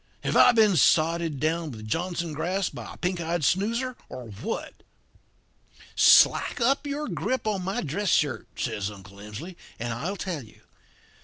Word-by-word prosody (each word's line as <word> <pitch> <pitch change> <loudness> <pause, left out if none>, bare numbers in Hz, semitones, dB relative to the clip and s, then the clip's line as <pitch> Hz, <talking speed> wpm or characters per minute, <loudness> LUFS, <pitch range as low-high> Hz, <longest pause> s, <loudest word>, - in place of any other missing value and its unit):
Have - - -1
I - - +8
been 220 -5 +4
sodded 160 0 +3
down 160 +2 -1
with 110 -4 -9
Johnson 170 +4 -2
grass 180 +5 -1
by - - -9
a - - -16
pink 180 -1 -2
eyed 170 0 -2
snoozer, 230 - 0
or 125 -3 -8
what?' 105 - -6 1.1
"'Slack - - +5
up 270 +5 +1
your 290 +1 -3
grip 260 -2 -2
in 210 -3 -1
my 195 +6 -2
dress 180 +6 -2
shirt,' 145 -5 +1
says 100 0 -2
Uncle 100 -1 -13
Emsley, 105 - -8 0.2
'and 120 0 -3
I'll 170 +12 -4
tell 175 -5 -4
you. 110 - -18
170 Hz, 160 wpm, -26 LUFS, 135-200 Hz, 1.1 s, I